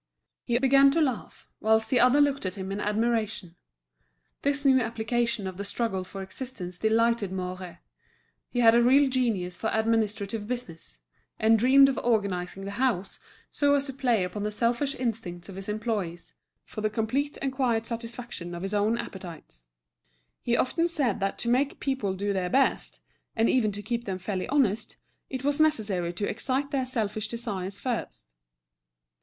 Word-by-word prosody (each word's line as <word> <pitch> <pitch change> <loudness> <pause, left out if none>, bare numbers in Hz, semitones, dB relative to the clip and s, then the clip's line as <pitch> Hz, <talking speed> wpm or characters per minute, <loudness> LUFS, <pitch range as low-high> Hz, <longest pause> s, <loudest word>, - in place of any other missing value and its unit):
He 240 -1 +1
began 275 +2 +6
to 330 - +2
laugh, 265 -7 -2
whilst 220 +1 +2
the 255 - +4
other 250 +4 +5
looked 285 -1 +2
at 185 - -4
him 190 -1 -5
in 200 - -3
admiration. 215 -4 -1 0.9
This 285 0 0
new 265 -1 +6
application 230 -1 -1
of 185 -1 -5
the 200 - -4
struggle 205 -2 -2
for 195 +1 -7
existence 190 -4 -7
delighted 225 -2 +2
Mouret; 185 -1 -5 0.7
he 245 - 0
had 225 -1 +7
a 235 - +5
real 270 +4 +5
genius 225 -9 0
for 220 - -2
administrative 220 -1 0
business, 170 - -6 0.4
and 220 0 +4
dreamed 270 +4 +7
of 270 - -1
organising 195 -4 -1
the 200 +5 -5
house, 205 -8 -1 0.3
so 285 -1 +3
as 280 0 0
to 270 - -6
play 245 -7 +1
upon 180 +3 -4
the 210 +1 -1
selfish 240 +6 0
instincts 210 -8 -4
of 190 - -8
his 195 +1 -7
employees, 210 -5 -3 0.3
for 215 - -7
the 215 - +1
complete 245 +7 -1
and 270 -1 -2
quiet 240 -4 +1
satisfaction 230 -6 -5
of 170 - -6
his 195 +1 -3
own 210 +3 +2
appetites. 170 - -9 0.7
He 240 0 +1
often 335 +6 +1
said 270 - 0
that 195 0 -1
to - - -3
make 260 +4 +1
people 260 -9 -1
do 200 +1 -1
their 185 -2 -1
best, 270 +4 +1 0.3
and 225 0 +3
even 220 -5 +2
to 205 +1 -6
keep 235 +3 -3
them 190 -2 -3
fairly 185 0 -3
honest, 230 -6 0 0.3
it 260 -1 -5
was 290 +2 +1
necessary 210 - +2
to 205 +4 -2
excite 265 +5 -2
their 265 -3 0
selfish 215 -3 -2
desires 200 -5 -4
first. - - -4
225 Hz, 170 wpm, -27 LUFS, 195-255 Hz, 0.9 s, had